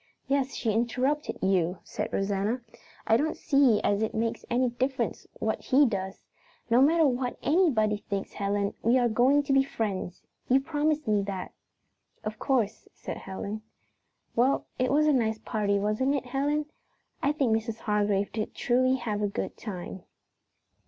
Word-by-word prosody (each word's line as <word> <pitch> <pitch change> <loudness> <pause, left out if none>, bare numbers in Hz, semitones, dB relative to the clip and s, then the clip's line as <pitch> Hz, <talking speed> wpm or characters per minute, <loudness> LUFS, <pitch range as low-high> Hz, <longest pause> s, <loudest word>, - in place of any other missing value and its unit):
"Yes, 275 0 0
she 225 - 0
interrupted 250 +7 0
you," 185 -2 +2
said - - -4
Rosanna. 200 +5 -1 0.4
"I 225 - +4
don't 310 +5 -1
see 275 -7 +4
as 205 +1 +1
it 220 - -1
makes 225 +1 -1
any 245 +1 +2
difference 260 +2 -2
what - - -2
he 280 +2 +4
does. 190 -5 -3 0.5
No 240 +2 +6
matter 320 +3 +5
what 250 -2 -1
_any_body 235 - +2
thinks, 200 -1 -4
Helen, 200 0 -1
we 235 +3 +4
are 245 -1 +3
going 255 +6 +3
to 275 - 0
be 270 - +6
friends? 205 -9 -3 0.3
You 260 +2 +5
promised 300 0 -1
me 210 -1 +3
that." 190 -2 -5 0.7
"Of 215 0 -5
course," 230 -6 0
said - - -6
Helen. 200 +3 -6 0.7
"Well, 255 +4 +2
it 255 - +1
was 300 +2 +4
a 305 - +4
nice 220 -4 +1
party, 210 -3 0
wasn't 215 +8 +1
it, 270 - -2
Helen? 285 +4 0 0.6
I 285 - +2
think 270 -7 +2
Mrs. 225 0 -3
Hargrave 205 -1 +1
did 215 -1 -4
truly 255 +2 +2
have 220 -5 -3
a 205 - +2
good 200 - -4
time." 190 -2 -7
235 Hz, 160 wpm, -28 LUFS, 205-270 Hz, 0.7 s, No